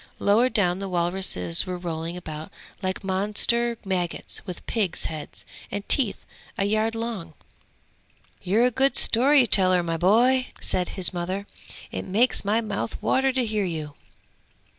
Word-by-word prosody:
Lower 225 +5 +3
down 185 -6 +1
the 195 -1 -5
walruses 175 - -1
were 180 -1 -4
rolling 170 0 -5
about 155 -3 -8 0.3
like 185 +1 -3
monster 210 +5 +1
maggots 180 -3 -3
with 180 - -8
pigs' 205 -7 -1
heads 155 -2 -7 0.2
and 205 0 -6
teeth 245 -8 +3 0.4
a 195 - +1
yard 215 +2 0
long!' 220 -9 -5 1.1
'You're 215 +7 +2
a 250 - +2
good 265 +3 +2
story 265 +3 +6
teller, 185 -4 +5
my 165 -1 -2
boy!' 245 +9 +3
said 180 -1 -2
his 185 0 +4
mother. 185 +3 -4 0.5
'It - - -4
makes 225 +7 +1
my 210 +3 +1
mouth 215 0 -4
water 265 0 +1
to 255 -1 0
hear 215 -2 -1
you!' 155 -4 -5
195 Hz, 145 wpm, -24 LUFS, 175-230 Hz, 1.1 s, story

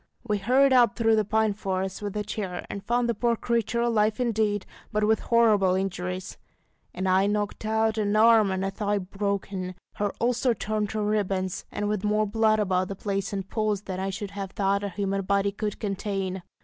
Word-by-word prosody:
We 210 -1 +1
hurried 260 +6 +4
up 240 -4 +5
through 225 -2 +3
the 215 - +2
pine 220 +1 +1
forest 190 -1 -3
with 205 0 -4
a 210 - -1
chair, 200 -4 -4
and 200 - -6
found 240 0 +1
the 235 - +1
poor 235 +2 +1
creature 235 0 0
alive 220 -2 +2
indeed, 215 -4 0 0.3
but 215 -1 0
with 220 +1 +3
horrible 215 -6 +3
injuries 185 -1 -3 0.6
an 185 - -2
eye 190 +1 +3
knocked 205 +1 -2
out, 220 0 +1
an 205 0 +1
arm 220 -1 +6
and 190 0 -1
a 195 - -1
thigh 205 0 -1
broken, 195 -1 -3 0.2
her 205 -1 0
ulster 240 0 +1
torn 215 +1 -1
to 215 +1 -3
ribbons, 195 -3 -1
and 205 - -2
with 210 -1 -1
more 210 0 +2
blood 215 +1 +2
about 185 -3 +1
the 195 - -5
place 195 0 -2
in 195 -1 -2
pools 210 0 -1
than 185 -2 -5
I 190 +1 -1
should 200 +1 -5
have 200 -1 -5
thought 200 0 +1
a 200 - -2
human 195 +1 -2
body 200 +1 +1
could 210 0 -4
contain. 195 -2 -3
205 Hz, 200 wpm, -26 LUFS, 195-220 Hz, 0.6 s, arm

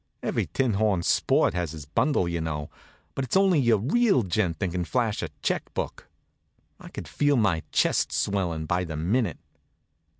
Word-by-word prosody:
Every - - -1
tinhorn 105 -7 +1
sport - - +2
has 85 -3 -2
his 75 -3 -8
bundle, 90 - +1
you 85 -1 -2
know; 75 -2 -4 0.4
but 135 - -2
it's 130 +8 +1
only 190 -5 +4
your 120 -4 +4
real 170 - +2
gent 90 -3 0
that 90 +1 -2
can 90 0 -1
flash 115 +2 -1
a 85 - -3
check - - -1
book. - - -4 0.7
I - - -11
could - - -8
feel 145 -1 +1
my 100 -8 +2
chest - - +2
swellin' 90 -6 -1
by 90 +3 0
the 80 -3 -5
minute. 95 - 0
95 Hz, 170 wpm, -26 LUFS, 85-125 Hz, 0.7 s, only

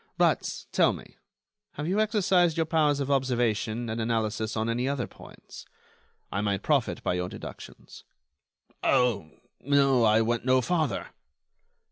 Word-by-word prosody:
But, - - +1
tell - - +3
me, - - -12 0.6
have 150 +1 -5
you 190 +4 +1
exercised 185 -6 +2
your 165 - +2
powers 155 -3 +2
of 140 0 -2
observation 120 -3 0
and 110 +1 -3
analysis 110 -1 -1
on 110 +1 0
any 120 +2 -1
other 140 -4 -1
points? - - -13 0.7
I 100 - -1
might 100 -2 -1
profit - - 0
by - - 0
your 90 0 -2
deductions." - - -11 0.8
"Oh! 125 -11 +2 0.3
no, 140 -3 +3
I 110 0 +4
went 115 +1 0
no 130 +1 +4
farther." 155 - -1
125 Hz, 140 wpm, -27 LUFS, 110-145 Hz, 0.8 s, I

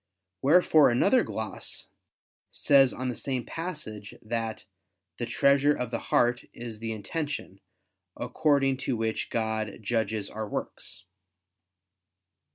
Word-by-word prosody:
Wherefore 155 0 +6
another 195 - +4
gloss 110 -2 -4 0.6
says 135 -2 +5
on 130 0 -3
the 125 - -3
same 130 -2 -2
passage 150 - -6
that 115 -1 -3 0.5
"the 120 - -2
treasure 140 +4 +4
of 125 -1 -3
the 115 - -1
heart 120 +1 +2
is 115 -2 -7
the 115 0 -3
intention, 110 - -4 0.6
according 140 -3 +2
to 130 -2 -2
which 110 0 -2
God 110 -2 -1
judges 110 -2 -1
our 110 0 -5
works." 95 -1 -5
120 Hz, 115 wpm, -28 LUFS, 110-140 Hz, 0.6 s, Wherefore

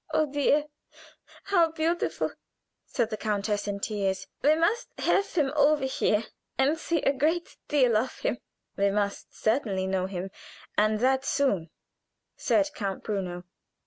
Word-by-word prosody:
"Oh, 310 - +2
dear, 290 +1 +2 0.8
how 345 -5 +3
beautiful!" 325 +2 0 0.6
said 235 -3 -1
the 215 - -2
countess, 210 -1 -1
in 200 -1 -2
tears. 195 -3 -1 0.2
"We 300 +2 +5
must 420 +10 +1
have 400 +1 +2
him 295 -5 +1
over 295 -1 +4
here 225 -4 +1 0.3
and 270 +4 +3
see 330 -1 -1
a 275 - +3
great 320 +6 0
deal 255 -6 +3
of 235 +5 0
him." 240 - -1 0.4
"We 200 0 +2
must 200 0 -2
certainly 215 -5 0
know 190 -1 0
him, 190 0 -5 0.4
and 215 0 +3
that 265 +1 +3
soon," 200 - +1 0.7
said 300 -1 +2
Count 195 -3 -4
Bruno. 185 -4 -3
250 Hz, 145 wpm, -28 LUFS, 200-295 Hz, 0.8 s, We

